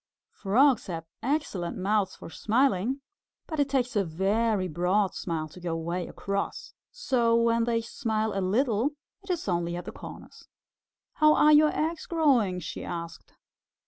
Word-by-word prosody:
Frogs 245 +4 +3
have 165 -3 -5 0.2
excellent 235 - -2
mouths 195 0 0
for - - -11
smiling, 250 +3 +1 0.4
but 315 -2 -5
it 285 -1 +2
takes 255 -2 0
a 205 - +3
very 195 +4 0
broad 180 +4 +1
smile 160 -3 -3
to 170 - -13
go 170 -2 -3
way 170 +2 -3
across, 200 0 -4 0.2
so 250 - +1
when 230 0 +3
they 230 -1 +1
smile 220 -2 -2
a 195 - -1
little 230 +6 +1 0.3
it 385 - -17
is 350 -9 -2
only 175 -1 -1
at 175 - -6
the - - -6
corners. - - -11 0.7
"How 305 0 +6
are 300 0 +6
your 300 +1 +7
eggs 320 +1 -2
growing?" 260 - +2
she 165 - -6
asked. 170 -1 -7
220 Hz, 155 wpm, -27 LUFS, 180-270 Hz, 0.7 s, your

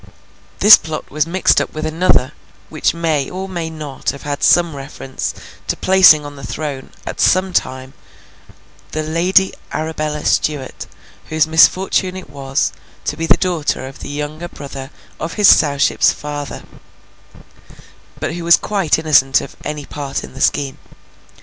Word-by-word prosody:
This 210 +2 +10
plot 160 -1 -7
was 155 +2 0
mixed 185 +3 +3
up - - -6
with 155 0 -3
another, 155 -4 +2 0.4
which 155 +1 0
may 160 -5 0
or 190 +1 -5
may 170 -4 -4
not 150 -4 -5
have 140 - -5
had 145 -1 -4
some 170 -3 +3
reference 135 -1 -5 0.4
to - - 0
placing 185 -6 +6
on 145 0 -8
the 140 - -11
throne, 145 -4 -5 0.2
at - - -6
some 185 0 +3
time, 130 -3 -2 1.0
the 155 - -2
Lady 180 +5 +2 0.2
Arabella 155 -1 -3
Stuart; 145 -4 -1 0.4
whose 155 0 +2
misfortune 185 +3 +3
it 185 -7 -10
was, 135 0 -1 0.3
to - - -2
be 165 +1 -3
the - - +5
daughter 170 -7 -1
of 135 0 -10
the - - -8
younger 150 +3 -5
brother 140 -4 -9 0.3
of 165 +1 -4
his 205 -2 +4
Sowship's 140 -2 +4
father, 145 -1 -6 1.6
but - - -3
who 175 0 -5
was 170 0 +6
quite 195 -7 0
innocent 145 -4 +3
of - - -9
any 150 -1 -5
part 140 -2 -5
in - - -10
the - - -9
scheme. 135 -2 0
155 Hz, 155 wpm, -17 LUFS, 140-170 Hz, 1.6 s, This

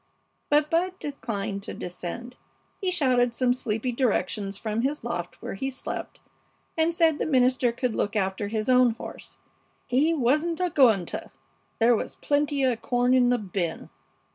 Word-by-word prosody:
But 295 +1 +3
Bud 365 +3 +1
declined 210 - -4
to - - -7
descend. 205 +8 -6 0.5
He 380 - +1
shouted 255 -9 +2
some 250 0 +2
sleepy 245 0 -2
directions 210 -5 -1
from 220 +1 -2
his 280 +2 -1
loft 175 -6 -4
where - - -4
he 265 +8 -3
slept, 260 - -6 0.5
and 325 +1 +1
said 325 -3 +3
the - - 0
minister 255 -3 +3
could 245 0 -2
look 205 +1 -1
after 195 0 -1
his 215 0 -2
own 250 -2 +5
horse, - - -10 0.5
he 275 +6 +2
"wasn'ta 325 +5 +1
gonta!" 225 - +3 0.5
There 235 +1 +5
was - - -4
"plentya 280 -5 +1
corn 245 +2 +2
in 250 -1 +5
the 245 - +3
bin." 185 -6 -4
245 Hz, 150 wpm, -26 LUFS, 215-285 Hz, 0.5 s, own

